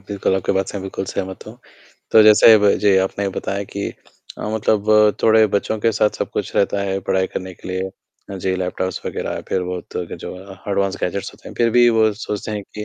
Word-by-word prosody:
बिल्कुल, 95 -1 -1
आपकी 95 -1 0
बात 95 -1 0
से - - -5
मैं - - -7
बिल्कुल 95 0 -4
सहमत 95 0 -5
हूँ, 110 +3 -11 0.5
तो 110 - +7
जैसे 110 +1 +8
ब 100 -1 +4
जी, 100 -2 +4
आपने 95 +1 0
बताया 100 +1 -3
कि 100 +1 -4 0.5
अ, - - -5
मतलब 105 -1 +3
थोड़े 110 0 +5
बच्चों 110 +2 0
के 115 +1 +2
साथ 105 0 +2
सब - - -3
कुछ - - -4
रहता 100 0 +1
है, 95 0 -1
पढ़ाई 95 0 +2
करने 95 0 -6
के - - -11
लिए, 95 +1 -3 0.5
जी, 95 +1 -1
लैपटॉप्स 95 0 -3
वग़ैरह - - -4
फिर 95 - 0
वो 90 0 -4
तो 90 - -3
कि - - -8
जो - - -8 0.4
एडवांस 100 -1 0
गैजेट्स 95 +2 -3
होते - - -13
हैं, - - -11
फिर 115 -1 +3
भी 120 0 +7
वो 110 -1 +4
सोचते 105 +1 -4
हैं 105 -1 -3
कि 105 0 -5
100 Hz, 220 wpm, -20 LUFS, 95-105 Hz, 0.5 s, जैसे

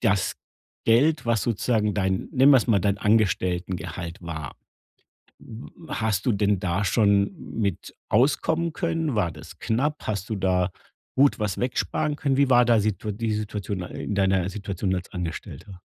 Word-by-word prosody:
das 100 -5 +1 0.5
Geld, 140 +7 +3
was 115 -3 +1
sozusagen 110 -2 0
dein 95 -2 -1
nennen 135 +2 +5
wir 135 - +8
es - - -2
mal 110 -4 +4
dein 100 +2 0
Angestelltengehalt 90 -5 0
war? 80 -5 -6 0.8
W 120 +8 -12
hast 110 -4 -1
du 125 - +3
denn 100 -1 +1
da 95 +2 -1
schon 100 -1 +2 0.2
mit 100 -5 -2
auskommen 150 +7 +2
können? 165 -2 -1
War 95 -7 +1
das - - -12
knapp? 145 +7 -1
Hast 105 0 -3
du - - 0
da 95 -1 +1 0.4
gut 140 +2 +4
was 105 -4 -2
wegsparen 145 +4 -1
können? 140 -2 0
Wie 140 -1 +3
war 125 -1 +6
da 120 -2 +4
Situa 105 0 -1
die 110 +1 -2
Situation 105 -3 -3
a 90 - -6
in 105 - -4
deiner 95 -2 +2
Situation 100 -2 -3
als 90 0 -6
Angestellter? 90 +1 -6
105 Hz, 160 wpm, -25 LUFS, 95-120 Hz, 0.8 s, wir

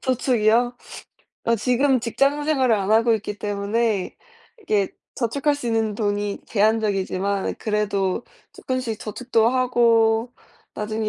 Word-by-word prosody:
저축이요? 245 -2 +1 0.7
아 230 0 +2
지금 255 +3 +2
직장 275 +5 0
생활을 265 -6 +2
안 200 -1 -1
하고 225 +1 +4
있기 210 -1 -5
때문에 205 0 -1 0.5
이게 205 - 0 0.2
저축할 280 +4 0
수 285 -4 -6
있는 225 -2 0
돈이 205 -1 -2
제한적이지만 200 -2 0
그래도 210 -1 -1 0.3
쪼끔씩 255 -4 -3
저축도 225 +1 0
하고 235 -2 +2 0.4
나중에 215 +1 -3
225 Hz, 270 characters per minute, -22 LUFS, 210-245 Hz, 0.7 s, 하고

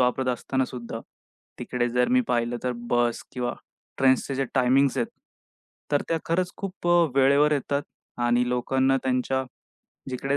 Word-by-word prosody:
वापरत 125 +1 +1
असताना 130 +2 -1
सुद्धा 120 -3 -7 0.6
तिकडे 120 -1 -1
जर 125 +1 +1
मी 255 0 +4
पाहिलं 120 0 0
तर 125 - +1 0.2
बस 120 -1 +1
किंवा 125 -1 -2 0.4
ट्रेन्सचे 135 +1 +3
जे 135 +1 0
टाईमिंग्ज 135 +1 +3
आहेत 120 - +1 0.9
तर 145 - +3
त्या 165 - +1
खरंच 175 +2 0
खूप 195 -2 -6
अ, 175 -1 +5
वेळेवर 140 +2 +4
येतात 140 0 0 0.4
आणि 120 +1 +2
लोकांना 130 +2 +2
त्यांच्या 130 +1 0 0.7
जिकडे 135 +2 -1
130 Hz, 145 wpm, -25 LUFS, 125-140 Hz, 0.9 s, अ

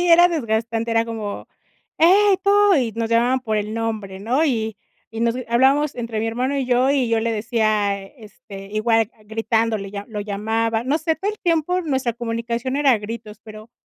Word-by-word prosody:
Sí 355 - +1
era 345 +1 +7
desgastante, 230 -6 -2
era 225 0 +2
como: 220 -3 -6 0.5
"Hey, 390 +4 +5
tú", 405 0 +4
y 245 -6 +1
nos 230 0 -2
llamaban 245 +3 +2
por 220 -3 -1
el 210 +1 -4
nombre, 215 -4 -4
¿no?, 250 +10 +1
y 220 -5 -1 0.3
y 225 0 -6
nos 235 0 +1
g 255 - -5
hablábamos 270 +5 +3
entre 230 -2 -4
mi 225 - -1
hermano 255 +5 -1
y 270 - 0
yo 255 +2 +3
y 265 -4 +1
yo 225 -1 +1
le 230 +1 -1
decía, 215 -3 0
este, 210 -3 -12
igual, 225 +1 +1
ah, 215 - -24
gritándole, 220 -2 -1
ya, 200 0 -6
lo 210 -2 -5
llamaba, 220 +2 -1
no 285 +4 +1
sé, 320 +1 0
todo 395 +6 -2
el 425 - -10
tiempo 345 +1 0
nuestra 265 -6 -1
comunicación 235 +2 -3
era 285 -2 +3
a 225 - +2
gritos, 215 0 -8
pero, 215 +1 -12
230 Hz, 200 wpm, -21 LUFS, 220-265 Hz, 0.5 s, era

